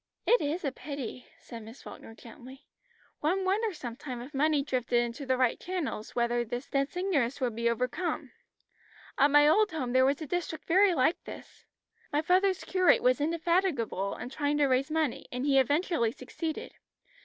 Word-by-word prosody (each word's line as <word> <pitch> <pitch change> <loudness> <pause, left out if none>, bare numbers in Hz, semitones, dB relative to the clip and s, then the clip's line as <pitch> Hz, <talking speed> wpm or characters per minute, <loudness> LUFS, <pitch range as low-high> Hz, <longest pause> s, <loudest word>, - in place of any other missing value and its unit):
"It 480 - +4
is 305 +4 -2
a 275 - 0
pity," 265 -3 -7
said 230 -1 -10
Miss 225 +4 -12
Falkner 225 - -11
gently. 250 +4 -13 0.5
"One 370 +6 0
wonders 400 -1 0
sometimes 245 0 -6
if 290 - -14
money 295 +1 +2
drifted 250 -3 0
into 240 +3 -3
the 260 0 +2
right 250 -2 +1
channels 345 -12 -4
whether 240 0 +1
this 245 +3 -5
dense 275 +5 -1
ignorance 290 -10 0
would 245 -4 -1
be 235 0 +1
overcome. 250 +9 -2 0.9
At 280 - +6
my 295 +1 +6
old 420 +7 +4
home 260 -6 -3
there 260 0 +5
was 275 +2 +2
a 315 - -5
district 330 0 -4
very 375 +1 +4
like 280 +4 +1
this. - - -11 0.5
My 295 +1 +1
father's 375 +2 +2
curate 370 -2 +3
was 255 +3 +3
indefatigable 325 - 0
in 245 - -6
trying 290 +1 -1
to 290 - +4
raise 265 +2 +1
money, 310 -4 -1
and 250 +2 -3
he 275 -2 +4
eventually 285 -3 +1
succeeded. 305 +5 -6
280 Hz, 175 wpm, -29 LUFS, 250-330 Hz, 0.9 s, At